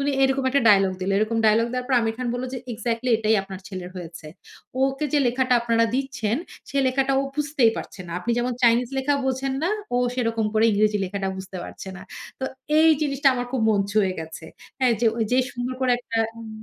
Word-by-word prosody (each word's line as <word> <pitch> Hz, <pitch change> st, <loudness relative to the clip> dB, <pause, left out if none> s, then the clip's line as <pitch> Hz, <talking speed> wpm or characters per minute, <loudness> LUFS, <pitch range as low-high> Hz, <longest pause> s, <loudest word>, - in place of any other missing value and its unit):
উনি 280 Hz, +1 st, +1 dB
এরকম 270 Hz, 0 st, +2 dB
একটা 280 Hz, 0 st, +2 dB
ডায়ালগ 195 Hz, -2 st, +5 dB
দিলো। 190 Hz, +2 st, -1 dB
এরকম 215 Hz, +2 st, 0 dB
ডায়ালগ 220 Hz, +2 st, +4 dB
দেওয়ার 250 Hz, 0 st, -3 dB
পর 265 Hz, -, +2 dB
আমির 225 Hz, -1 st, -1 dB
খান 250 Hz, 0 st, -3 dB
বলল, 245 Hz, +1 st, -3 dB
যে -, -, -3 dB
"এক্সাক্টলি! 230 Hz, +2 st, -2 dB
এটাই 220 Hz, 0 st, +2 dB
আপনার 195 Hz, -1 st, -9 dB
ছেলের 185 Hz, -2 st, -7 dB
হয়েছে। 170 Hz, -2 st, -8 dB, 0.6 s
ওকে 270 Hz, +2 st, 0 dB
যে 295 Hz, -, +4 dB
লেখাটা 250 Hz, +1 st, +2 dB
আপনারা 230 Hz, -1 st, +2 dB
দিচ্ছেন, 260 Hz, -5 st, -1 dB, 0.3 s
সে -, -, -5 dB
লেখাটা 265 Hz, +1 st, +1 dB
ও -, -, 0 dB
বুঝতেই 290 Hz, -5 st, +2 dB
পারছে -, -, -7 dB
না। 170 Hz, -, -7 dB
আপনি 230 Hz, -, -3 dB
যেমন 245 Hz, +1 st, 0 dB
চাইনিজ 235 Hz, 0 st, +4 dB
লেখা 275 Hz, +2 st, +1 dB
বোঝেন 265 Hz, 0 st, -1 dB
না, 355 Hz, -, +1 dB, 0.2 s
ও -, -, +3 dB, 0.2 s
সেরকম 230 Hz, -3 st, 0 dB
করে 220 Hz, +1 st, +4 dB
ইংরেজি 210 Hz, 0 st, +2 dB
লেখাটা 195 Hz, +1 st, -3 dB
বুঝতে 190 Hz, 0 st, -8 dB
পারছে -, -, -9 dB
না।" -, -, -10 dB, 0.4 s
তো -, -, -1 dB, 0.3 s
এই 320 Hz, +1 st, +6 dB
জিনিসটা 280 Hz, -1 st, +2 dB
আমার 245 Hz, 0 st, -3 dB
খুব 260 Hz, -, 0 dB
মন 205 Hz, -2 st, +2 dB
ছুয়ে 200 Hz, -3 st, +2 dB
গেছে। 160 Hz, 0 st, -8 dB, 0.3 s
হ্যাঁ, 255 Hz, -3 st, +3 dB
যে 240 Hz, -, +3 dB
ঐযে 230 Hz, +3 st, +1 dB
সুন্দর 245 Hz, +1 st, -4 dB
করে 255 Hz, -1 st, +3 dB
একটা 230 Hz, -2 st, -4 dB, 0.2 s
উম 225 Hz, -, -8 dB
235 Hz, 210 wpm, -24 LUFS, 210-260 Hz, 0.6 s, এই